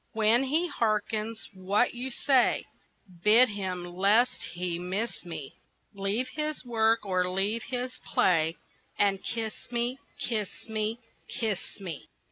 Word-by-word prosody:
When 225 +4 +4
he 315 +6 +1
harkens 215 -3 -1
what 195 +5 +1
you 245 +2 -3
say, 260 0 +3 0.6
Bid 230 +4 +7
him, 190 -4 -3
lest 200 +7 +3
he 175 -1 -2
miss 195 +6 -2
me, 160 -5 -7 0.4
Leave 200 +5 0
his 305 -1 -2
work 225 -2 +2
or 185 -2 +1
leave 200 +5 0
his 250 0 -2 0.2
play, 165 -2 +3 0.4
And 195 -1 +2
kiss 225 -2 -2 0.2
me, 240 +2 -1 0.2
kiss 215 -3 -3
me, 220 0 -1 0.3
kiss 215 -5 -3
me! 175 -7 -6
215 Hz, 125 wpm, -29 LUFS, 190-240 Hz, 0.6 s, Bid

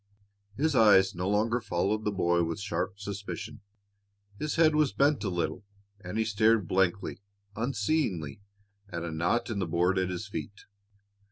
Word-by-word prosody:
His 150 +1 +1
eyes 100 -4 +6
no 90 +1 -2
longer 110 +4 +1
followed 105 +3 -1
the 105 - +1
boy 85 -3 +2
with 85 +4 -3
sharp 95 -1 -3
suspicion. 100 +1 -6 0.8
His 155 0 -2
head 160 -1 +5
was 150 -3 +2
bent 140 -1 +2
a 100 - -1
little, 85 0 -2 0.4
and 90 +4 -5
he 110 - +1
stared 110 -2 +2
blankly, 95 +1 0 0.3
unseeingly, 105 - -1 0.5
at 85 -2 -5
a 85 - -4
knot 90 +9 0
in 105 - -2
the 95 - -1
board 90 +3 +2
at 95 0 0
his 90 +3 -4
feet. 105 0 -7
100 Hz, 160 wpm, -29 LUFS, 90-115 Hz, 0.8 s, eyes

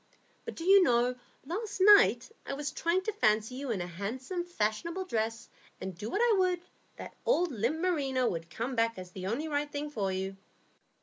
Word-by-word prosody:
But - - -6
do 330 - -6
you 390 +2 +7
know, 245 -5 +3 0.3
last 395 +7 -4
night 410 +3 +6 0.2
I - - -3
was 285 0 -3
trying 340 +5 0
to 435 - -1
fancy 215 - +2
you 270 +1 -5
in 210 -6 -1
a - - -3
handsome, 245 - -4
fashionable 335 - -2
dress, 225 -6 -2 0.3
and 190 -1 -5
do 210 +5 -6
what 405 - 0
I 460 -4 +4
would, 365 -2 +1 0.3
that - - -9
old 355 -9 +2
limp 240 +6 -1
merino 275 -8 +1
would 165 -3 -3
come 245 +6 -4
back 230 -1 +1
as 185 -1 -8
the 185 0 -6
only 260 +10 -2
right 290 -1 -1
thing 295 +1 -4
for 200 -8 -1
you. 190 +1 -3
265 Hz, 195 wpm, -30 LUFS, 215-350 Hz, 0.3 s, you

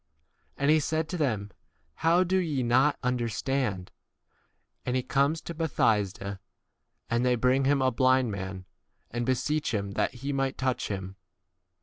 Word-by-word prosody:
And 140 +2 +3
he 155 - +5
said 155 +1 -1
to - - -3
them, 110 - -1 0.5
How 170 +3 +4
do 185 +1 +1
ye 155 -8 0
not 130 +5 +3
understand? 120 -4 -1 0.9
22 - - -21
And 125 - 0
he 130 - +1
comes 140 +5 +1
to 170 - -6
Bethsaida; 105 - 0 0.7
and 120 +1 +1
they 125 -1 +3
bring 130 +3 +2
him 140 -1 +3
a 130 - +3
blind 130 -1 +3
man, 95 -1 -5 0.5
and 120 +1 -2
beseech 130 +1 0
him 100 -1 -2
that 100 - -1
he 140 +4 -4
might 135 -1 -1
touch 130 -1 -1
23 100 - -2
him. 95 - -15
130 Hz, 160 wpm, -28 LUFS, 115-145 Hz, 0.9 s, he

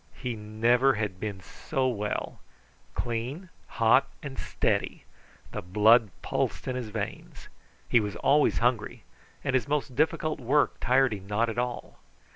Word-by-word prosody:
He 125 -3 -4
never 115 +5 +2
had 105 -4 -3
been 100 -2 -4
so 130 +10 -2
well. 105 -4 -3 0.6
Clean, 125 +10 -3 0.3
hot, 115 +4 +5 0.2
and 140 -2 -6
steady - - -1 0.5
the - - -4
blood 105 +5 +5
pulsed - - -2
in 130 - -1
his 125 -4 -4
veins. 105 -1 -6 0.4
He 120 - +4
was 105 -3 -3
always 145 +1 +3
hungry, 120 -2 0 0.4
and 135 - -1
his 130 +1 +1
most 140 -3 -1
difficult 155 +1 +1
work 135 +4 +1
tired 130 0 +3
him 100 -2 -8
not 110 +3 +1
at 115 +1 -3
all. 125 0 -4
120 Hz, 145 wpm, -28 LUFS, 105-135 Hz, 0.6 s, hot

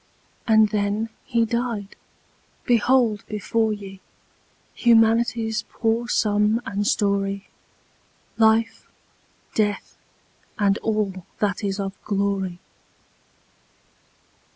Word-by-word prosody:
And 220 -1 +5
then 210 +1 -1 0.2
he 235 -3 +1
died! 230 -3 -3 0.7
Behold 235 -2 +3
before 220 +2 0
ye 195 -2 -7 0.7
Humanity's 225 -1 +3
poor 230 +1 -1
sum 210 +1 +2
and 200 +1 -2
story; 200 -1 0 0.9
Life, 225 0 +2 0.7
Death, 205 -2 -1 0.6
and 200 -1 +2
all 200 -5 -2
that 205 0 -1
is 200 0 -2
of 195 -1 -3
glory. 195 -3 -1
215 Hz, 80 wpm, -23 LUFS, 200-225 Hz, 0.9 s, And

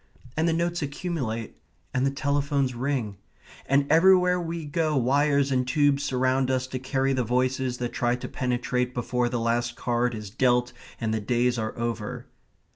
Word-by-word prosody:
And 160 +2 +1
the - - +3
notes 170 +1 -1
accumulate. 140 - -4 0.4
And 130 +1 +2
the - - 0
telephones 140 -1 0
ring. 120 -5 -2 0.5
And 140 +1 +3
everywhere 180 +2 +5
we 165 -1 -4
go 155 0 0
wires 140 +2 +2
and 125 -1 +1
tubes 145 0 +3
surround 130 0 +1
us 130 -1 0
to 130 - -4
carry 135 +1 0
the 130 -1 +1
voices 125 +1 0
that 120 -1 -4
try 120 0 +1
to 125 - -6
penetrate 125 -1 -1
before 125 0 0
the 120 -1 -2
last 120 +1 0
card 120 0 0
is 105 -2 -7
dealt 125 +1 +2 0.3
and 110 -2 -1
the 110 - -1
days 120 +2 +1
are 110 0 -4
over. 115 -3 -3
130 Hz, 170 wpm, -26 LUFS, 120-145 Hz, 0.5 s, everywhere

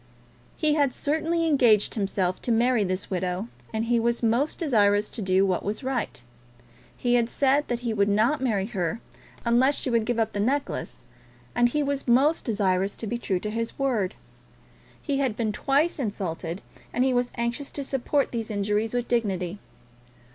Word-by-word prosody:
He 305 -1 +2
had 285 -4 +2
certainly 320 +3 0
engaged 245 -9 +4
himself 195 -3 -1
to 240 - -2
marry 235 0 +3
this 185 +1 -3
widow, 185 +4 -2 0.2
and 220 0 -1
he 235 0 +2
was 235 +1 0
most 235 +7 +1
desirous 210 - +2
to 230 - -4
do 190 0 +3
what 185 -2 0
was 210 +6 -3
right. 255 - -2 0.7
He 245 -1 0
had 240 -1 +3
said 280 +3 +2
that 240 0 -2
he 235 -2 -1
would 200 -1 +2
not 230 +8 +2
marry 215 -7 +1
her 195 -3 -2 0.5
unless 250 +4 +4
she 255 - -2
would 230 -2 +2
give 240 0 -1
up 225 -1 +1
the 205 - -3
necklace, 270 +7 -2 0.5
and 240 0 +3
he 295 +4 0
was 280 -1 -2
most 275 +7 +3
desirous 195 -3 0
to - - -6
be 235 +2 -3
true 190 -5 -1
to 210 - -3
his 230 +1 -3
word. 235 -9 0 0.8
He 280 -3 -2
had 255 -6 0
been 220 -2 0
twice 290 +9 +1
insulted, 185 -6 -4 0.3
and 245 - +1
he 260 -1 +2
was 245 0 +1
anxious 235 +4 -2
to 285 - -4
support 275 +1 0
these 230 -2 -3
injuries 210 +2 -1
with 245 -1 -1
dignity. 200 -5 -1
235 Hz, 180 wpm, -26 LUFS, 205-265 Hz, 0.8 s, engaged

